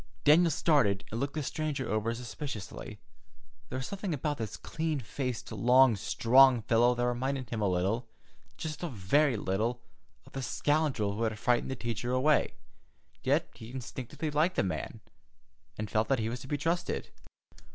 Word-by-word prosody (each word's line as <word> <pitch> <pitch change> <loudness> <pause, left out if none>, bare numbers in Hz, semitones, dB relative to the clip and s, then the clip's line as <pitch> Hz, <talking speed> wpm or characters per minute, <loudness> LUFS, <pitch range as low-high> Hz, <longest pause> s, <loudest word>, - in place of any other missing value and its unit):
Daniel 165 +4 +6
started, 135 - +2
and 115 - -3
looked 140 +2 -2
the 155 - -1
stranger 150 -2 -2
over 110 +1 0
suspiciously. 120 -3 -7 0.7
There 130 - -4
was 130 - -3
a - - -6
something 195 -4 -3
about 145 0 -2
this 110 -3 -4
clean 160 -2 -2
faced, 125 0 -4
long, 125 +3 +5
strong 125 +4 +5
fellow 120 +2 +3
that 120 0 0
reminded 125 0 -2
him 115 -2 -2
a 105 - +2
little, 95 +7 0 0.5
just 155 -1 -5
a 175 - -2
very 125 +4 +2
little, 110 +6 -1 0.4
of - - -16
the 135 - -3
scoundrel 135 -5 0
who 110 - -4
had 110 -2 0
frightened 120 +4 +1
the 130 - -2
teacher 120 0 -3
away; 145 +4 +2 0.7
yet - - +2
he 115 -1 -11
instinctively 130 +4 -5
liked 155 +5 +2
this - - +2
man, 90 - -4 0.8
and 110 - -3
felt 110 0 +2
that 135 - +2
he 110 -1 -1
was 125 +2 -4
to 130 - -10
be 145 - -1
trusted. 170 +4 -2
125 Hz, 170 wpm, -30 LUFS, 110-145 Hz, 0.8 s, Daniel